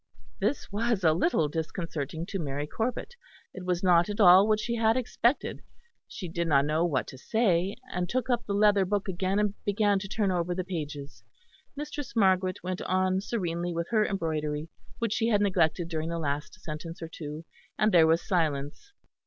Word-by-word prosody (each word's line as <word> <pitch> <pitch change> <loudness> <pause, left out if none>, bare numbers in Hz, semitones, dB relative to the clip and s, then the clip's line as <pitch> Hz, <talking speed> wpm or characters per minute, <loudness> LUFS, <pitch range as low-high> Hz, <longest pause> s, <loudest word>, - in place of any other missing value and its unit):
This 210 +5 -1
was 220 -1 0
a 160 -2 +5
little 160 -2 +2
disconcerting 160 0 -4
to 195 +1 -4
Mary 145 -2 -3
Corbet; 245 - -3 0.4
it 185 - -8
was 180 0 -1
not 175 0 +4
at 205 - -4
all 190 0 +8
what 215 -1 +3
she 235 +2 -2
had 225 0 +2
expected. 250 +1 0 0.5
She 185 - -7
did 170 0 -2
not 140 -3 +4
know 155 +2 +1
what 150 -7 0
to 130 - -11
say; 195 - +1 0.2
and 180 -1 -2
took 255 +3 -1
up 240 -2 0
the 200 - -1
leather 205 -1 +4
book 200 +2 -1
again 190 +1 -1
and 210 -1 +1
began 205 -1 +2
to 195 - -6
turn 200 -1 0
over 175 0 -1
the 185 - -2
pages. 150 -6 -6 0.5
Mistress 290 -2 -6
Margaret 185 -3 +2
went 185 0 -3
on 185 0 +1
serenely 175 -5 -2
with 170 0 -3
her 215 -2 +4
embroidery, 155 -5 -2 0.3
which 230 -2 -1
she 225 - +1
had 210 -3 +3
neglected 175 -4 +1
during 160 -1 -3
the 170 - -2
last 150 +2 -3
sentence 165 0 -7
or - - -4
two; 155 0 -8 0.3
and 215 0 +3
there 165 -3 +6
was 165 +1 +2
silence. 160 - -1
185 Hz, 185 wpm, -28 LUFS, 165-205 Hz, 0.5 s, all